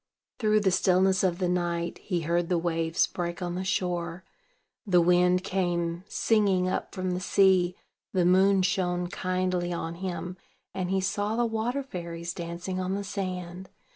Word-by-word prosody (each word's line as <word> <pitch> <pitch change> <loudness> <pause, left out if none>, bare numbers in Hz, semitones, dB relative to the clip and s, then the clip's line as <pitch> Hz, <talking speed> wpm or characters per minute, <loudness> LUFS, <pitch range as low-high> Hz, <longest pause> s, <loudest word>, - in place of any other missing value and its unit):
Through 215 -2 +3
the 195 -2 +2
stillness 185 +1 +3
of 180 -2 +1
the 180 -1 0
night, 175 -1 -1
he 180 -4 -2
heard 170 +1 0
the 180 - +2
waves 165 -1 +1
break 175 0 -4
on 175 -2 -3
the 185 +1 -3
shore; 175 -2 -2 0.6
the 185 -5 +3
wind 180 +1 +4
came 175 -2 -1
singing 200 -5 +2
up 185 - -2
from 185 -1 -2
the 180 - -1
sea; 185 -2 +3 0.4
the 180 -2 +2
moon 190 +1 +4
shone 180 -2 0
kindly 185 -2 -1
on 165 -1 -3
him, 180 0 -5 0.4
and 185 -1 -2
he 190 0 +1
saw 205 +3 -1
the 240 +1 +2
water 235 +5 -1
fairies 170 -7 -6
dancing 175 +2 -5
on 185 +1 -1
the 200 - -3
sand. 185 -2 -5
180 Hz, 165 wpm, -27 LUFS, 175-190 Hz, 0.6 s, wind